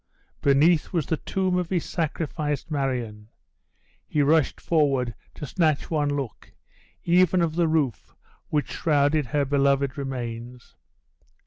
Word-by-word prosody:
Beneath 150 +4 +3
was 165 -6 0
the 160 - -1
tomb 185 +1 -1
of 180 -1 -3
his 180 -3 -1
sacrificed 155 -2 -3
Marion! 125 -7 -2 0.8
He 150 - +1
rushed 150 0 +2
forward 135 -7 +1 0.2
to - - -6
snatch 155 +1 0
one 150 -2 +1
look, 135 -6 -6 0.5
even 180 +1 +4
of 165 -2 +1
the 170 0 +2
roof 155 -7 -1 0.3
which 150 -3 -1
shrouded 145 -2 +1
her 145 +3 0
beloved 140 0 +1
remains. 120 -2 -6
145 Hz, 125 wpm, -25 LUFS, 135-160 Hz, 0.8 s, even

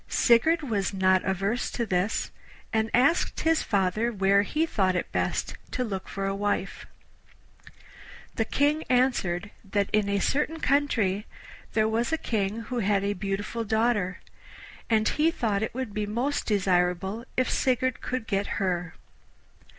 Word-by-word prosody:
Sigurd 315 +8 +4
was 205 -7 -1
not 185 -1 +3
averse 195 +5 -1
to 235 - -2
this, 190 +1 -1 0.4
and 220 0 +1
asked 275 +8 +2
his 325 0 +2
father 205 +4 0
where 200 -1 +3
he 305 +10 0
thought 190 - +1
it 175 - -2
best - - -1
to 255 - -2
look 195 -5 -4
for 195 0 -4
a 195 - 0
wife. 205 +1 -2 1.5
The 225 - 0
King 295 +6 +1
answered 210 -7 +1
that 200 0 -1
in 210 -1 +2
a 200 - +1
certain 300 +9 0
country 230 -9 +1 0.5
there 215 -1 +3
was 230 +5 0
a 320 - +2
King 215 -5 -2
who 245 +2 -4
had 200 -2 +1
a 200 +1 0
beautiful 205 +4 -3
daughter, 220 -3 0 0.7
and 220 -1 +3
he 310 +2 +2
thought 215 -10 -1
it 220 - -3
would 255 -5 -4
be 210 0 -2
most 245 +7 -1
desirable 190 +1 +1
if 255 - +2
Sigurd 255 -1 0
could 255 -3 -3
get 200 -1 -1
her. 180 -3 -1
215 Hz, 150 wpm, -27 LUFS, 195-245 Hz, 1.5 s, Sigurd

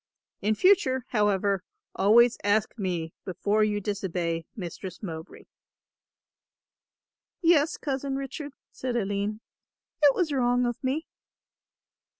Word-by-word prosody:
In 215 +1 +1
future, 260 - +3
however, 200 -3 +1 0.3
always 235 +4 +5
ask 205 +1 +1
me 175 -6 -3
before 205 +3 +1
you 210 -1 +1
disobey 175 -5 -2
Mistress 185 0 -7
Mowbray." 160 -4 -7 2.0
"Yes, 330 -3 +3
Cousin 275 -1 -2
Richard," 275 +1 -5 0.2
said 255 -2 -4
Aline, 205 0 -1 0.6
"it 285 -2 +6
was 335 -6 0
wrong 245 -1 +2
of 240 +1 -3
me." 280 +5 -1
215 Hz, 105 wpm, -27 LUFS, 195-265 Hz, 2.0 s, it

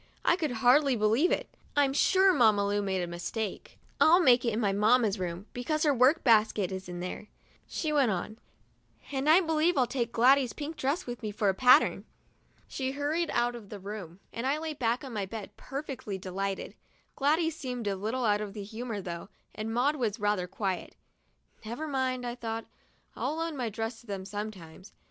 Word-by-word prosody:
I - - +5
could 325 -4 -1 0.2
hardly 275 +1 +5
believe 225 +10 +2
it. - - 0 0.3
I'm 280 -2 +3
sure 380 +6 +4
Mamma 215 - +4
Lu 205 0 0
made 190 -2 -1
a - - -3
mistake. 185 +5 -5 0.2
"I'll 340 +3 +7
make 250 -8 +5
it 235 - +1
in 215 - -1
my 205 -4 +2
mamma's 215 0 +3
room, 180 +1 -4
because 305 +5 -1
her 295 -2 +4
work 265 +6 +4
basket 215 -5 +3
is 190 -1 -6
in 175 0 -6
there," 180 +3 -6 0.4
she 310 -2 -2
went 280 -5 +3
on; 215 +3 -3 0.7
"and 275 +1 0
I 335 +4 +7
believe 320 0 +1
I'll 255 - +4
take 240 -2 -2
Gladys's 255 +2 +4
pink 305 +2 -6
dress 285 +3 -1
with 245 0 -6
me 215 - -3
for 205 -1 0
a - - +2
pattern." 250 +6 +5 0.6
She 265 -1 -3
hurried 305 +4 -1
out 240 0 +1
of 225 -4 -10
the 210 - -7
room 195 -3 -8
and 235 +3 -3
I 280 +2 +1
lay 315 0 -4
back 240 -3 -1
on 265 -3 -7
my 200 -3 -2
bed, 215 0 -8
perfectly 270 -8 -6
delighted. 190 +1 -4 0.4
Gladys 315 +3 +1
seemed 250 -6 -5
a 200 -1 0
little 225 +6 -2
out 210 -1 +2
of 210 -1 -6
humor 220 +1 -5
though, 170 +1 -6 0.2
and 215 +1 -4
Maud 265 +6 +1
was 230 -4 -1
rather 205 -3 0
quiet. 190 -1 -3 0.7
"Never 235 +8 -5
mind," 260 -3 -1
I 240 - -3
thought; 225 -2 -5 0.5
"I'll 305 - -2
loan 330 -1 -3
my 245 -4 -2
dress 225 +2 -5
to 240 - -22
them 195 -2 -5
sometimes. 200 -3 -8
235 Hz, 195 wpm, -29 LUFS, 205-275 Hz, 0.7 s, I'll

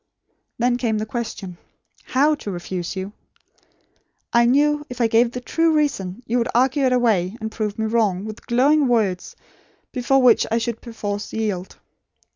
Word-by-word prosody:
Then 245 +1 +1
came 230 -3 0
the 215 - -2
question: 220 -6 -6 0.5
how 290 +4 +3
to 285 -8 -5
refuse 175 0 -4
you. 190 +2 -5 1.2
I 235 0 +5
knew 295 +3 +3
if 250 0 -8
I 235 - +3
gave 230 +1 +3
the 250 - -6
true 330 +6 +1
reason, 245 -8 -1
you 240 +2 0
would 235 - 0
argue 265 +3 +3
it 255 - +2
away, 220 -5 +1
and 220 -1 -5
prove 210 -2 -3
me 220 - -1
wrong, 215 -4 +1
with 215 0 -9
glowing 275 +4 +3
words, 210 -7 0 0.6
before 255 +2 +2
which 240 -3 +5
I 225 - +1
should 230 -1 -3
perforce 210 -3 -5
yield. 205 -5 -3
230 Hz, 165 wpm, -22 LUFS, 210-250 Hz, 1.2 s, I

